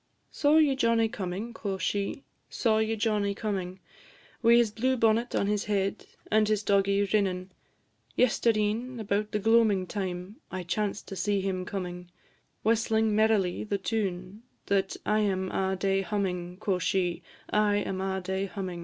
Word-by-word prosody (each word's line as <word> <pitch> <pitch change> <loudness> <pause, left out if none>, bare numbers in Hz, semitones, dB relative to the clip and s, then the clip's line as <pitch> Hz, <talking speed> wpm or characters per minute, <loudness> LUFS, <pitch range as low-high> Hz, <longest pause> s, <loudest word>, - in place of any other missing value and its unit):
"Saw 295 +1 +3
ye 295 -4 +4
Johnnie 230 -3 +3
comin'?" 205 +2 -4
quo' 200 -4 -3
she; 200 +7 -2 0.3
"Saw 220 -3 +1
ye 220 0 0
Johnnie 210 -2 0
comin'? 190 -4 -3 0.6
Wi' 235 0 +6
his 235 -3 +4
blue 255 +5 0
bonnet 230 +1 +2
on - - +2
his 205 0 0
head, 195 -2 -1 0.2
And 215 0 +4
his 215 -1 +1
doggie 200 0 +3
rinnin'. 190 -2 0 0.7
Yestreen, 230 0 +1
about 210 0 -1
the - - 0
gloamin' 215 -3 +3
time, 185 +1 -5
I 185 0 -4
chanced 205 +4 -2
to 195 - -5
see 200 +2 0
him 185 -1 -2
comin', 180 -2 -5 0.5
Whistling 220 -1 +2
merrily 215 -4 +2
the 205 -1 -1
tune 190 0 -3 0.2
That 195 -1 0
I 215 0 +2
am 190 -3 0
a' 190 0 0
day 195 +1 +1
hummin'," 180 -3 -3
quo' 195 -2 -1
she; 180 -1 0 0.3
"I 210 -1 +3
am 195 -2 -2
a' 190 0 -2
day 190 +1 -2
hummin'. 185 -2 -5
200 Hz, 155 wpm, -28 LUFS, 190-220 Hz, 0.7 s, Wi